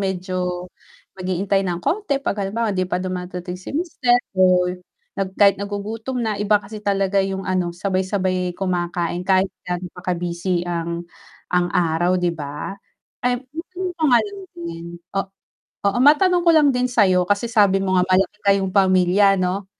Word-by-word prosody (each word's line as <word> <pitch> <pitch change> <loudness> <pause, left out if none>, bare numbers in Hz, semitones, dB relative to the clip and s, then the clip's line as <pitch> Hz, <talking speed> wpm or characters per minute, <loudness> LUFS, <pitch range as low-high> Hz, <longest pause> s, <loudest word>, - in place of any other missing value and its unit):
medyo, 180 -2 -2 0.5
mag-iintay 185 +2 0
ng 175 -1 -2
konti, 365 -7 0
'pag 275 -6 -2
halimbawa, 210 +3 -1
hindi 185 -1 -1
pa 180 - 0
dumadating 180 0 -5
si 280 - -5
mister, 280 -8 +2 0.2
o 185 -1 +4 0.6
nag 190 0 -3
kahit 200 -1 +5
nagugutom 215 +5 -4
na, 215 -2 -1
iba 210 0 +4
kasi 210 +1 -9
talaga 195 -1 +1
yung 195 0 -3
ano, 185 -2 -1
sabay-sabay 185 0 -1
kumakain, 175 -1 -2
kahit 190 0 +3 0.2
ga'no 180 0 -3
pa 180 - -11
ka-busy 175 +1 -2
ang, 170 0 -3 0.5
ang 180 0 +2
araw, 175 +2 +2
'di 175 -1 0
ba? 150 +2 -6 0.5
Eh, 250 0 +2 0.2
matanong 360 +3 -5
ko 325 - -6
nga 240 - +7
lang 405 -1 -8 0.2
din, 170 -1 -6 0.3
o - - +3 0.7
oo, 225 - -2
matanong 350 +5 +5
ko - - +8
lang 300 -2 +6
din 250 0 +1
sa'yo, 190 -6 +4
kasi 205 +4 +1
sabi 205 -4 +4
mo 185 -1 +1
nga, - - +4
malaki 190 +2 +1
kayong 195 -1 +2
pamilya, 190 +1 +4
ano, 185 +1 -1
190 Hz, 160 wpm, -21 LUFS, 180-205 Hz, 0.7 s, ko